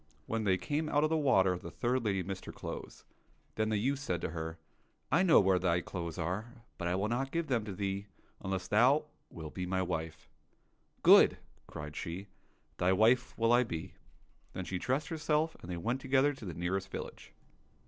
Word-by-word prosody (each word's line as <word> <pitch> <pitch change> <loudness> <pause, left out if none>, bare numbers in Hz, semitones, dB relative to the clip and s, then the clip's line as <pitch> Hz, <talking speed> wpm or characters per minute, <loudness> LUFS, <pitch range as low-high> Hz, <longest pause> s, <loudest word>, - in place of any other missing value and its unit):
When 110 -1 -2
they 95 -2 +3
came 155 +7 -2
out 145 0 +2
of 155 - +2
the - - +3
water 95 - +3
the - - -8
third 125 +1 -1
lady 100 -4 0
missed 95 +1 -6
her - - -6
clothes. - - -8 0.5
Then 110 0 0
the 110 - +1
youth 135 +6 0
said 90 -11 -2
to - - -3
her, 80 0 -5 0.3
" - - -43
I 170 - +4
know 180 -4 +7
where 95 -2 +3
thy 90 -1 +2
clothes 85 -3 -5
are, 110 +9 -4 0.2
but 85 - -2
I 90 - +1
will 100 +3 0
not 125 +4 -1
give 165 +3 -1
them 120 -7 0
to 105 - -5
thee 100 +1 -3 0.4
unless 95 -1 -2
thou 130 +8 +4 0.2
wilt 80 -2 -8
be 90 -1 -4
my 95 0 0
wife." 80 -2 -4 0.2
— - - -41
" - - -40
Good! - - +8
" - - -33
cried 75 0 -7
she, 85 +4 -5 0.3
" - - -39
thy 90 +1 +3
wife 115 +6 +3
will 115 +1 +3
I 120 +1 +5
be." 85 -9 -5 0.6
Then 95 -1 -4
she 90 0 -3
dressed 135 +8 -1
herself, 160 -1 0
and 85 - -10
they 85 - -3
went 120 +9 -2
together 135 +2 +3
to 135 -5 -10
the 85 -4 -5
nearest 95 +2 -2
village. - - -7
100 Hz, 215 wpm, -32 LUFS, 90-130 Hz, 0.6 s, Good